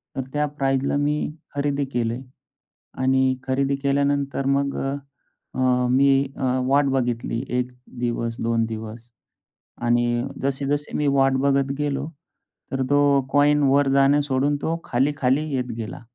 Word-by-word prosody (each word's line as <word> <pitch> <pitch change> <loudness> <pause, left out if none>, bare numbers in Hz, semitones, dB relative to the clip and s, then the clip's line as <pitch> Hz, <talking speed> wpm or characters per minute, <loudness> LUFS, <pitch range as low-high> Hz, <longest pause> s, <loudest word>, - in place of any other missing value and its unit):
तर 135 - -1
त्या 150 0 +1
प्राईसला 135 0 +1
मी 145 +1 +1 0.4
खरेदी 140 0 0
केली 115 -1 0 0.9
आणि 130 0 +3
खरेदी 135 +1 0
केल्यानंतर 140 0 0
मग 140 0 -1 0.8
अ, 125 -1 +2
मी 135 +1 +4 0.4
वाट 140 +2 +4
बघितली 120 -3 -1
1 125 0 -1 0.3
दिवस, 115 -1 -2
2 115 0 +1
दिवस 110 +1 -7 0.7
आणि 120 0 +2 0.2
जसे-जसे 140 +2 -1
मी 150 - +1
वाट 135 0 +4
बघत 140 -1 +2
गेलो 145 -1 -1 0.6
तर 135 -1 -1
तो 145 -1 +4
कॉइन 145 +1 +4
वर 140 +1 +4
जाणे 140 +1 +4
सोडून 140 +1 +1
तो 165 +1 -1
खाली-खाली 135 +2 +1
येत 125 -1 -2
गेला. 115 +1 -6
135 Hz, 125 wpm, -23 LUFS, 125-140 Hz, 0.9 s, मी